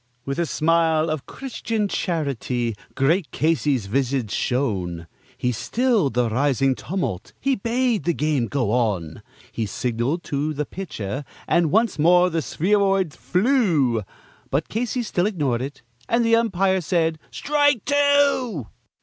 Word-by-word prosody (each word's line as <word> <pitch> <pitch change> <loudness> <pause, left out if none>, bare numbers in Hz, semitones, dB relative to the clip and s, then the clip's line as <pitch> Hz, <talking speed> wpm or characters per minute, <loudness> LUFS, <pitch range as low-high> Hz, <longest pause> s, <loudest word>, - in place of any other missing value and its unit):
With 140 +3 -3
a 170 - +1
smile 160 0 +2
of 155 -3 -4
Christian 230 -5 -3
charity 135 - -2 0.2
great 155 +6 +2
Casey's 145 -7 +1
visage 125 0 -1
shone; 95 -10 -1 0.3
He 125 - 0
stilled 210 - +1
the 125 -1 +2
rising 135 +3 +2
tumult; 145 - -4
he 275 -1 +1
bade 235 +1 0
the 170 - +2
game 150 -6 0
go 125 -6 -1
on; 105 -10 -1 0.3
He 110 -2 -3
signaled 125 - -2
to 150 +2 -2
the 150 +1 -2
pitcher, 145 - -5 0.2
and 170 -2 +3
once 220 +1 +2
more 180 +3 +5
the 165 0 0
spheroid 195 0 +1
flew, 165 - +2 0.5
But 140 +4 -1
Casey 240 +2 -1
still 185 -3 0
ignored 145 - -1
it; 135 0 -6 0.3
and 235 0 +2
the 230 0 +5
umpire 195 -4 +2
said, 160 -1 0
"Strike 290 -5 +1
two." 285 - +2
155 Hz, 135 wpm, -23 LUFS, 130-200 Hz, 0.5 s, more